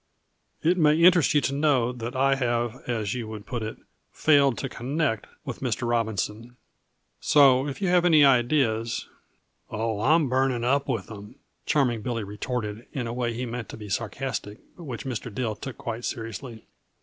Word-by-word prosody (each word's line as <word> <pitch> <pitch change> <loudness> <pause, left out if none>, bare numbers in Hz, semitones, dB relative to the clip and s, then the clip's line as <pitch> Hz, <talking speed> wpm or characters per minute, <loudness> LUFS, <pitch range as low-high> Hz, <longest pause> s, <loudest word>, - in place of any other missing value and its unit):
It 175 +3 +3
may 150 -1 +5
interest 170 -3 +5
you 145 - +5
to 135 - -1
know 140 -5 +2
that 120 0 -6
I 135 +1 +3
have, 120 -1 -1
as 110 -4 -1
you 120 -3 -4
would 110 -1 -8
put 120 -4 -4
it, 110 +1 -5 0.3
'failed 140 -5 +3
to - - -3
connect' 130 -1 -2 0.2
with - - -5
Mr. 120 - -2
Robinson. 115 +1 -2 0.6
So, 135 -2 +5
if 145 +8 -5
you - - +2
have 175 -1 +4
any 155 -4 +6
ideas 120 -3 +2 0.3
" - - -48 0.3
"Oh, 110 -1 -2
I'm 155 +4 +4
burning 130 -1 +1
up 140 +3 +1
with 115 -5 -2
'em," 105 +3 -10 0.3
Charming 130 -7 +2
Billy 115 -1 -3
retorted 105 +2 -4
in 130 -5 -3
a 115 - -4
way 120 -1 -1
he 125 +2 -3
meant 120 -1 -5
to - - -8
be 105 -2 -9
sarcastic, 115 0 -3 0.2
but 170 - -11
which 125 -3 -6
Mr. 125 -2 -4
Dill 110 0 -2
took 130 +4 -8
quite 115 0 -5
seriously. 115 +1 -6
120 Hz, 180 wpm, -26 LUFS, 115-140 Hz, 0.6 s, any